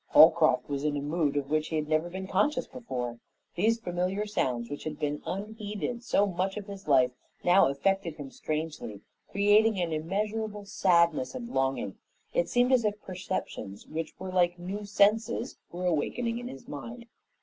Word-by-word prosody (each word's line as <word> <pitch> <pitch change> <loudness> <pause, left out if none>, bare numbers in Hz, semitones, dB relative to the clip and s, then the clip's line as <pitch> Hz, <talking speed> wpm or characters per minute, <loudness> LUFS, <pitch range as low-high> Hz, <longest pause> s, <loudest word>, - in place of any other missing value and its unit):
Holcroft - - +6
was 140 -1 -3
in 150 -1 0
a - - 0
mood 145 0 0
of 140 0 -2
which 155 0 +1
he 160 - -3
had 155 -1 -1
never 155 +2 +1
been 190 +2 -5
conscious 230 +9 +1
before. 125 - -5 0.3
These 225 +6 +2
familiar 185 +1 -1
sounds, 125 - -1
which 145 +2 -6
had 155 -1 -4
been 150 0 -2
unheeded 210 +4 -4
so 205 -4 +3
much 190 +1 -1
of 205 - -5
his 200 -3 -9
life, 130 -3 +5 0.3
now 180 -3 +6
affected 170 +4 0
him 145 -3 -8
strangely, 155 -10 -4 0.3
creating 205 +1 +4
an 170 -2 0
immeasurable 205 +6 -2
sadness 170 - +2
and 240 -2 -5
longing. 135 - -1 0.3
It 170 0 +1
seemed 245 +1 +3
as 250 -2 +4
if 210 -1 0
perceptions 180 - -5
which 160 0 -5
were 190 0 -6
like 175 -1 +2
new 195 +4 -5
senses 220 +4 +2
were 180 +1 -4
awakening 230 +8 0
in 245 - -6
his 135 - -10
mind. 230 - -7
180 Hz, 170 wpm, -29 LUFS, 150-210 Hz, 0.3 s, Holcroft